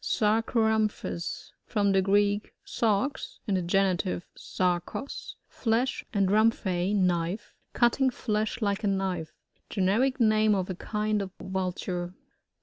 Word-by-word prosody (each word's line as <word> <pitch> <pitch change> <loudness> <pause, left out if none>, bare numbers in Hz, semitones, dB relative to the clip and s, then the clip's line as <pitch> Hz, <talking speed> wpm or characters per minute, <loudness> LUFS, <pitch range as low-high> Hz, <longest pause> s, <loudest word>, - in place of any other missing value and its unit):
Sarooeamphus. 220 -4 0
— - - -53
From 205 -3 +2
the 195 0 +4
Greek, 205 +2 +1
tarXf 225 +5 -1
(in 205 - -1
the 185 - +2
genitivQ, 185 0 +1
Barho9^) 180 +9 -3
flesh, 240 +2 0
and 200 -3 +2
ramphe, 205 -3 +2
knife: 180 +1 0 0.2
cutting 250 +2 +3
flesh 220 -1 -2
like 200 +1 0
a - - +2
knife. 190 -5 -1 0.4
Generic 220 +8 +1
name 215 -2 +4
of 185 -1 -1
a - - -4
kind 210 +2 -1
of 195 - -4
Vnlture. 180 -1 -3
205 Hz, 125 wpm, -28 LUFS, 185-220 Hz, 0.4 s, the